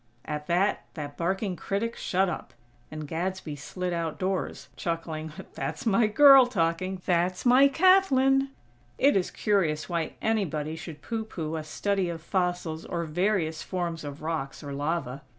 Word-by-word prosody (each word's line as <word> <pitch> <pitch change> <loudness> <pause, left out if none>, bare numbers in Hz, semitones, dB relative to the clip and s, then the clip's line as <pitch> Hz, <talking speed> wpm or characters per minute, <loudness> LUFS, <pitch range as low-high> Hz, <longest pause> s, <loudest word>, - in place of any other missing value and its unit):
At 150 -1 -4
that 185 +4 +1
that 145 -3 -6
barking 190 +2 -1
critic 215 +6 -2
shut 190 +1 +1
up! 170 -7 -5 0.3
And 155 -1 -6
Gadsby 170 -1 -3
slid 180 +5 -4
outdoors, 170 +3 -2
chuckling: 160 -2 -4 0.2
"That's 150 - -4
my 220 0 +4
girl 270 +3 +8
talking!! 185 -3 -1
That's 180 +3 +1
my 255 +3 +7
Kathlyn!!" 275 -5 +4 0.5
It 280 +2 +4
is 190 -2 +1
curious 170 -8 0
why 170 -2 -2
anybody 160 -9 -1
should 165 -2 -9
pooh 225 -1 -3
pooh 160 -6 -4
a 160 - -3
study 195 +4 -1
of 165 -2 -6
fossils 175 -3 -1
or 170 -1 -3
various 165 -1 0
forms 170 -4 -3
of 145 +1 -7
rocks 155 -3 -3
or 140 -1 -6
lava. 145 -2 -2
175 Hz, 150 wpm, -27 LUFS, 155-200 Hz, 0.5 s, girl